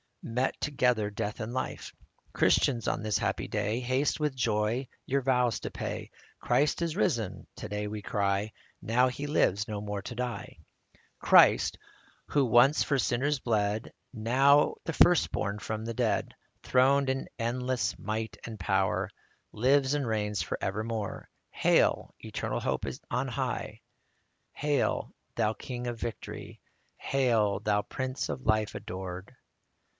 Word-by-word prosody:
Met 125 +3 -1
together 125 -7 +1
death 105 0 -4
and 115 +1 -4
life. 130 - -4 0.4
Christians, 120 -5 +3
on - - 0
this 110 -1 +1
happy - - -1
day, 110 +4 -1
Haste 130 +5 0
with 150 -3 0
joy 115 +1 0 0.2
your 140 +1 +1
vows 125 -4 +2
to - - -5
pay: - - -5 0.2
" - - -30
Christ 150 +4 +2
is 165 -1 -2
risen," 120 - -1
to - - -6
day 105 0 -3
we 105 0 -5
cry; 100 0 0 0.3
Now 125 +3 +3
he 130 +3 -4
lives 105 -8 +2
no 105 -1 -3
more 105 -1 -4
to 120 - -6
die. 125 0 -4 0.4
61 - - -29 0.2
Christ, - - +6 0.5
who 145 -2 +2
once 125 +5 +5
for 140 - +1
sinners 130 +4 +1
bled, 110 -2 -1 0.2
Now 135 +6 +4
the 165 - -2
first 175 +2 +5
born 100 0 -2
from 110 +2 -4
the 115 - -3
dead, - - 0 0.3
Throned 135 +2 +3
in 130 0 -1
endless 125 -1 -1
might 110 +1 -3
and 110 -2 -7
power, 95 +1 +1 0.4
Lives 135 +4 +3
and 145 -2 -1
reigns 105 -3 -1
for 85 - -3
evermore. 110 +1 -3 0.2
Hail, - - +2
eternal - - -3
Hope - - -1 0.2
on - - -1
high! - - -3 0.7
Hail, 145 -1 0 0.2
Thou 110 - +1
King 125 +1 -6
of 120 -1 -4
victory! 115 -2 -6 0.4
Hail, 115 -7 +1
Thou 105 -1 +1
Prince 130 +4 -3
of 130 - -5
Life 110 -1 +2
adored 95 +2 -7
115 Hz, 145 wpm, -29 LUFS, 105-130 Hz, 0.7 s, Christ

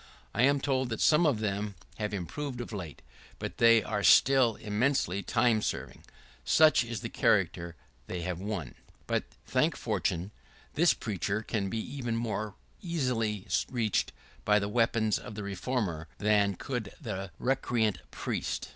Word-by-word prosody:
I - - +1
am 140 +2 +4
told 130 -2 0
that 115 - -3
some 160 +2 +5
of 120 -7 +1
them 100 -1 -2 0.2
have 105 -1 -2
improved 125 - -4
of 120 -2 -6
late; 90 -7 -7 0.3
but - - -6
they 115 -1 +6
are 105 -1 -2
still 130 +1 +5
eminently 105 -3 0
time 110 +1 +2
serving. - - -4 0.4
Such 155 - +5
is 115 -3 -5
the - - -3
character 85 0 +1 0.3
they 90 - -4
have 90 0 -3
won. 95 - -3
[¶27] - - -16 0.3
But, - - 0 0.2
thank - - +1
fortune, 90 +5 -1 0.4
this 170 +2 +4
preacher 105 0 -2
can 100 -3 -2
be 115 - -3
even 120 0 -3
more 110 -3 -3 0.3
easily 125 - -1 0.2
reached 115 -5 0 0.3
by 105 0 +4
the 100 -1 0
weapons 115 -1 +2
of 105 - -9
the 105 - -5
reformer 100 -5 -2
than 100 -1 +2
could 120 -1 -4
the 100 - -5
recreant 120 -6 0
priest. - - -3
110 Hz, 155 wpm, -30 LUFS, 100-125 Hz, 0.4 s, they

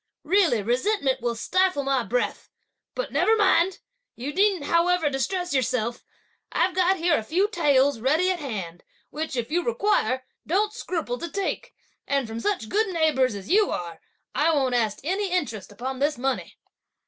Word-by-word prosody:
Really 320 - +3
resentment 265 - 0
will 240 -1 -1
stifle 370 +5 +1
my 270 -1 +1
breath! 245 +1 -2 0.5
but - - -3
never 445 - +3
mind! 380 -3 +3 0.4
you 270 +5 -5
needn't 390 -3 +2
however 335 -2 +2
distress 355 +6 -2
yourself. 240 -3 -1 0.5
I've 370 - +1
got 370 +1 +3
here 340 -1 +2
a - - -6
few 360 - +1
taels 285 - +2
ready 310 +10 +2
at 365 - -2
hand, 195 - -6 0.3
which, 310 -2 -4
if 240 +1 -3
you 350 +2 +1
require, 410 - +1 0.2
don't 415 +5 +1
scruple 325 - -3
to 340 - -5
take; 395 +4 -3 0.3
and 275 -3 0
from 225 +1 -5
such 310 - -1
good 435 - +1
neighbours 310 - +1
as 200 0 -7
you 415 +1 +4
are, 170 -2 -5 0.3
I 315 +3 +2
won't 270 -5 +1
ask 220 -4 +1
any 385 +5 -1
interest 285 - -2
upon 255 +5 -5
this 290 +1 +1
money." 265 +1 -3
295 Hz, 165 wpm, -25 LUFS, 245-370 Hz, 0.5 s, you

